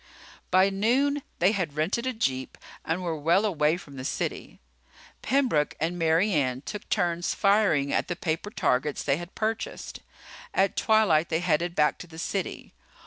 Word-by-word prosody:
By 190 +2 +4
noon 260 +9 +1 0.2
they 180 +3 +4
had 180 -9 -2
rented 195 +11 0
a 255 - -1
jeep 130 - -2 0.3
and 170 +3 -2
were 170 -2 -2
well 170 +7 +2
away 160 -5 +2
from 145 -6 -12
the 130 - -6
city. - - -4 0.6
Pembroke 255 - +1
and 165 +3 -1
Mary 165 +5 +2
Ann 130 -4 0
took 210 +8 -7
turns 175 -3 0
firing 195 -9 +3
at - - +1
the 175 - -2
paper 165 +3 -2
targets 150 - 0
they 135 0 +1
had 175 +2 -9
purchased. 220 +1 -3 0.6
At 195 +1 +2
twilight 205 -8 +3
they 160 - +1
headed 175 0 0
back 150 0 +2
to 180 - -9
the 160 -1 -13
city. 185 +2 -4
175 Hz, 165 wpm, -27 LUFS, 155-205 Hz, 0.6 s, By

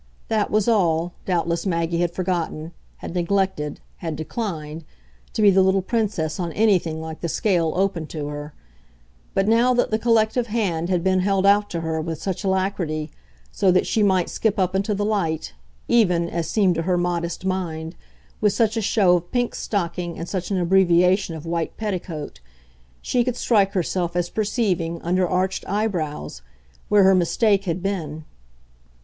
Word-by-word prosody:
That 215 -2 +1
was 210 0 +1
all, 175 -6 +2
doubtless 170 0 0
Maggie 170 -1 0
had 175 -1 +1
forgotten, 175 -3 -3 0.3
had - - -7
neglected, 180 -4 -1 0.2
had 165 -3 -4
declined, 160 -2 -5 0.5
to 215 - 0
be 205 - +7
the 190 0 +4
little 190 0 +3
Princess 195 -8 -1
on 170 -2 -2
anything 185 -7 +2
like 160 0 -7
the 170 - -2
scale 170 -4 +1
open 180 -4 0
to 150 -2 -5
her; 145 +1 -6 0.8
but 195 +1 +2
now 235 +3 +4
that 245 - +1
the 220 - +1
collective 230 +1 +2
hand 185 -7 -1
had 180 -2 +1
been 190 0 +2
held 195 0 +1
out 205 +1 +4
to 170 - -3
her 160 -1 -2
with 160 -1 -4
such 190 +1 -3
alacrity, 185 -6 -1 0.4
so 195 - +2
that 185 0 +3
she 220 - 0
might 190 -4 +3
skip 220 -2 -1
up 185 -1 +1
into 200 +2 0
the 205 +1 -1
light, 165 - -1 0.3
even, 180 -8 +3
as 170 -1 -3
seemed 195 -1 +3
to 165 - -1
her 180 +1 +1
modest 175 0 -2
mind, 165 -4 -3 0.5
with 210 -2 +3
such 225 -2 +1
a 225 - 0
show 190 -3 +4
of 175 0 -8
pink 245 -1 0
stocking 175 -3 -3
and 165 - -5
such 185 -2 -3
an 195 - 0
abbreviation 180 0 +3
of 160 0 -8
white 165 0 -3
petticoat, 180 -8 -4 0.6
she 245 - +1
could 250 -1 -2
strike 200 -4 +2
herself 175 -1 -1
as 175 0 -1
perceiving, 190 -7 -1
under 180 +1 +1
arched 185 +1 0
eyebrows, 160 - -2 0.5
where 205 -1 +5
her 190 0 +6
mistake 195 +3 +2
had 175 0 -2
been. 160 -6 -3
185 Hz, 170 wpm, -23 LUFS, 165-200 Hz, 0.8 s, be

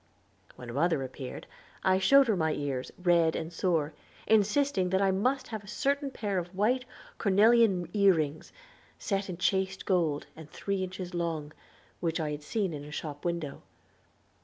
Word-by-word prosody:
When 120 -1 -8
mother 150 0 +1
appeared 130 0 -7 0.4
I 190 0 +3
showed 275 +6 +6
her 220 - +3
my 160 -3 +1
ears 140 -3 -3
red 170 -3 +3
and 160 +2 -4
sore, 165 -4 0 0.3
insisting 215 -1 +2
that 190 +1 +2
I 195 -1 +3
must 255 +8 0
have 220 -2 -5
a - - -15
certain 280 +5 0
pair 205 -7 -2
of 175 +1 -7
white 245 +6 +1 0.3
cornelian 205 -2 +4
ear 200 -3 +5
rings, 155 -1 -3 0.5
set 195 -1 -2
in 175 - -5
chased 190 +1 0
gold, 165 -6 +1
and 160 -1 -11
three 195 +2 -2
inches 185 -1 -6
long, 165 -3 -3 0.5
which 165 -1 -1
I 155 -2 -1
had 150 0 -5
seen 195 +2 -2
in 145 -1 -6
a 150 - -10
shop 150 -1 -6
window. 170 -5 -3
180 Hz, 165 wpm, -29 LUFS, 160-200 Hz, 0.5 s, showed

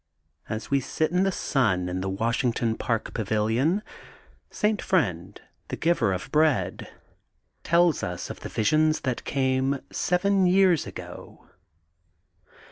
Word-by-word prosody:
As 110 +4 -5
we 140 - +4
git 155 +5 -1
in 180 +1 +2
the 195 0 +2
sun 110 - 0
in 90 +1 -3
the 95 - -2
Washington 115 +2 0
Park 115 -2 -2
Pavilion, 115 - 0 0.7
Saint 210 -1 0
Friend, 95 - -1 0.3
the - - -4
Giver 165 -11 +1
of 90 -1 -4
Bread, 155 -3 +1 0.7
tells 170 -1 +3
us 90 -2 -4
of - - -9
the - - -7
visions 155 +7 +2
that 130 -3 -2
came 135 0 0
seven 190 +1 +2
years 185 -3 +3
ago. - - -10
135 Hz, 125 wpm, -26 LUFS, 110-170 Hz, 0.7 s, we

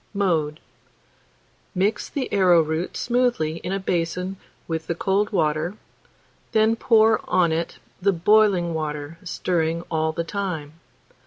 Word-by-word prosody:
Mode. 160 -6 0 1.2
Mix 195 +4 0
the 275 -3 -3
arrowroot 170 -3 +3
smoothly 240 -11 +1
in 180 - -5
a 195 - -1
basin 180 +1 -2 0.3
with 160 -1 -3
the 170 - -1
cold 195 +4 +1
water, 155 0 0 0.8
then 220 +1 +4
pour 225 -1 +4
on 180 -2 +3
it 165 +1 -2 0.2
the 200 +2 +4
boiling 190 -1 +3
water, 150 0 -4
stirring 170 -2 -1
all 160 -1 +1
the 170 +1 -3
time. 165 -5 -4
175 Hz, 120 wpm, -23 LUFS, 160-200 Hz, 1.2 s, then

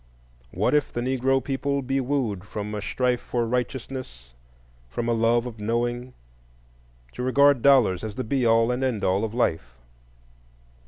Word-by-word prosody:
What - - 0
if 150 -1 +2
the - - -4
Negro 130 +1 +1
people 140 +1 -1
be 135 +1 0
wooed 125 -8 -1
from 105 +1 -6
a 105 - -3
strife 125 +3 0
for 120 -1 -2
righteousness, 125 - -4 0.5
from 115 - -4
a 120 - +2
love 115 +1 +2
of 115 -3 -8
knowing, 120 +3 -2 1.0
to - - -6
regard 140 +1 +4
dollars 125 -10 +4
as 110 -2 -5
the 130 - -3
be 130 +2 -1
all 115 0 +4
and 125 +2 -2
end 120 -6 -1
all 95 +3 +1
of 110 0 -3
life? 70 - -1
120 Hz, 160 wpm, -25 LUFS, 110-130 Hz, 1.0 s, regard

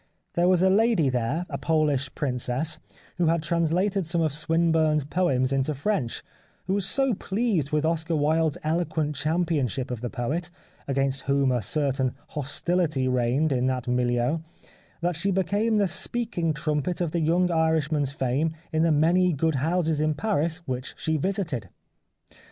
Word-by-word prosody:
There 175 +1 +2
was 185 -1 +3
a 190 - +5
lady 210 - +3
there, 125 +7 -1
a - - -5
Polish 150 -4 +1
princess, 135 +3 -1 0.4
who 175 -2 +2
had 165 -1 +1
translated 175 +5 +1
some 170 +1 +1
of 155 -3 +1
Swinburne's 160 -1 +2
poems 140 -6 +1
into 135 +2 0
French, 140 - -1 0.4
who 190 - -1
was 195 -1 +1
so 270 -3 +2
pleased 200 - -1
with 150 +1 0
Oscar 165 0 0
Wilde's 155 +1 +1
eloquent 155 -2 -1
championship 145 - -1
of 120 -3 -4
the 120 - -3
poet, 145 +8 -3 0.4
against 135 0 0
whom 140 -1 +2
a 125 -2 +1
certain 135 +2 0
hostility 150 0 0
reigned 125 +4 +1
in 130 -1 +1
that 130 -1 -2
milieu, 125 +4 +1 0.6
that 175 0 0
she 170 +5 0
became 200 +4 +1
the 200 -2 +3
speaking 185 -2 -1
trumpet 150 +2 -1
of 175 -3 -1
the 170 - 0
young 175 +3 +2
Irishman's 160 -3 +1
fame 140 +3 -1 0.2
in 160 - +2
the 165 0 +3
many 170 +4 +3
good 160 +2 +1
houses 160 -1 +1
in 155 0 +1
Paris 170 -4 -1
which 130 0 -4
she 160 - -1
visited. 155 - -2
155 Hz, 155 wpm, -26 LUFS, 135-175 Hz, 0.6 s, a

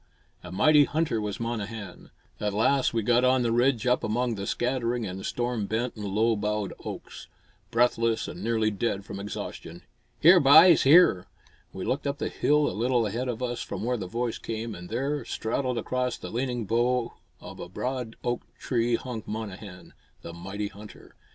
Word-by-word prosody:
A 90 - -10
mighty 145 +9 +5
hunter 155 -8 -1
was 105 -1 -4
Monnehan. 110 -4 -5 0.3
At 105 -1 -2
last 130 +5 +2
we 115 -1 -1
got 120 +3 +3
on 130 0 +3
the 115 - +1
ridge 120 0 +2
up 125 0 +2
among 120 +3 0
the 100 -2 -5
scattering 120 -2 -1
and 95 0 -6
storm 120 -4 -2
bent 115 +3 -2
and 105 - -7
low 110 +3 +2
boughed 105 -1 -2
oaks; - - -8 0.4
breathless 115 -1 +1
and 90 - -7
nearly 110 -1 +1
dead 100 -1 -2
from 100 - -7
exhaustion. 90 -4 -7 0.4
"Here, 175 +3 +8
byes, 155 +4 +8
here!" 140 - +6 0.4
We 95 - -6
looked 140 +2 -1
up 140 0 -2
the - - -2
hill 150 0 +2
a - - -2
little 120 +1 +1
ahead 115 +5 -2
of 125 0 -3
us 120 -1 -2
from - - -5
where 125 +2 0
the 95 -4 -5
voice 115 +3 -3
came, 115 0 -4
and 90 -2 -9
there, 135 +6 -2
straddled 125 +2 -2
across 125 +1 -1
the - - -8
leaning 120 -1 -2
bough 120 +2 +1 0.3
of - - -11
a - - -7
broad 125 -3 -4
oak 120 0 -1 0.2
tree 120 -2 0
hung 120 -2 -5
Monnehan, 100 -4 -7 0.3
the 85 - -8
mighty 95 +4 -5
hunter. 105 +1 -14
115 Hz, 180 wpm, -27 LUFS, 105-125 Hz, 0.4 s, Here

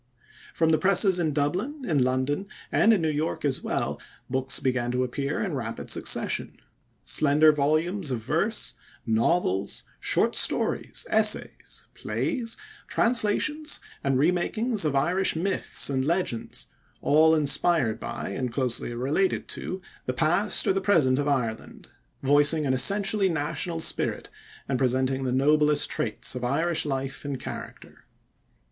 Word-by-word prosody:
From 160 -1 +2
the 155 - +3
presses 190 -1 +3
in 160 -3 0
Dublin, 185 - -2
in 145 -6 +2
London, 130 +8 -1 0.2
and 220 - +4
in 200 -7 +2
New 160 - +1
York 150 +1 -2
as 135 -2 0
well, - - -3 0.3
books 130 0 0
began 125 -2 -1
to 125 0 +1
appear 140 +3 -3
in 195 -6 -2
rapid 115 -5 -4
succession - - 0 0.5
slender 155 +1 +4
volumes 155 +5 0
of 125 - -1
verse, 165 - -1 0.3
novels, 110 - 0 0.2
short - - +1
stories, - - +1
essays, - - +1
plays, 150 - -3 0.3
translations, 250 +7 +1 0.2
and 135 -1 +1
remakings 180 - +1
of 145 -2 0
Irish 175 +8 +1
myths 190 +4 +1
and 130 -2 -1
legends, 165 -6 -2 0.4
all 160 +2 +5
inspired 145 -5 +1
by, 120 +1 -5
and 125 -2 -3
closely 120 -1 -2
related 145 +10 0
to, 185 0 -5 0.2
the 125 - 0
past 175 +8 +1
or - - +3
the 195 - -1
present 145 -10 +3
of 145 - -1
Ireland, 120 -6 -3 0.3
voicing 145 +3 +4
an 130 - +1
essentially 195 +7 +2
national 165 +1 -2
spirit - - -2 0.4
and 130 -2 -1
presenting 130 +1 0
the 125 - -1
noblest 150 +3 +3
traits 105 - -3
of 125 0 -6
Irish 155 +6 0
life 135 -1 -4
and 140 -3 -4
character. - - -9
150 Hz, 140 wpm, -26 LUFS, 130-180 Hz, 0.5 s, all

